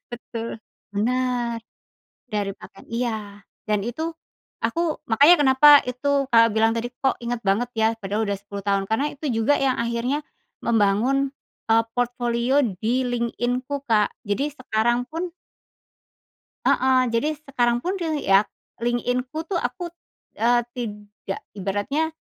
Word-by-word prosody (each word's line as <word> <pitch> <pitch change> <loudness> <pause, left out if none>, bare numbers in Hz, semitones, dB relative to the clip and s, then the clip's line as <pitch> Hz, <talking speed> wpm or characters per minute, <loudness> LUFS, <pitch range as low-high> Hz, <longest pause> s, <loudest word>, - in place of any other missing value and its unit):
Betul, 230 -1 -6 0.3
benar. 240 +1 0 0.6
Dari 205 -3 -2
pakaian - - -14
iya 230 -1 -1 0.5
dan 210 0 +1
itu 315 +8 -3 0.5
aku 335 -2 -1
makanya 285 +10 +6
kenapa 265 +2 +6 0.2
itu 275 +2 0
Kakak 230 -1 +6
bilang 225 +1 +3
tadi, 235 +1 -3
"Kok 265 +2 -1
inget 240 0 -2
banget 230 +5 +1
ya 220 +1 +3
padahal 205 +2 -2
udah 200 - 0
10 200 0 -8
tahun?" 200 -1 +1
Karena 280 +7 +1
itu 295 +2 -6
juga 225 +5 +2
yang 265 -2 +2
akhirnya 235 +5 -1 0.4
membangun, 235 +5 +2 0.4
eee, 225 0 +5
portfolio 245 +2 +1 0.2
di 245 +4 +1
LinkedIn-ku 245 +3 -1
kak. 215 -4 +3 0.2
Jadi 270 +9 0
sekarang 240 -2 0
pun 340 +3 -3 1.4
Heeh, 260 0 +4
jadi 230 +6 +1 0.2
sekarang 240 -3 +2
pun 365 +2 0
te 335 - -2 0.2
ya 195 0 +6 0.4
LinkedIn-ku 250 +5 -1
tuh 370 - +1
aku, 340 +8 -3 0.5
eee, 240 +1 +3
tidak 210 -4 -6
ibaratnya 205 +12 -1
240 Hz, 130 wpm, -23 LUFS, 225-265 Hz, 1.4 s, makanya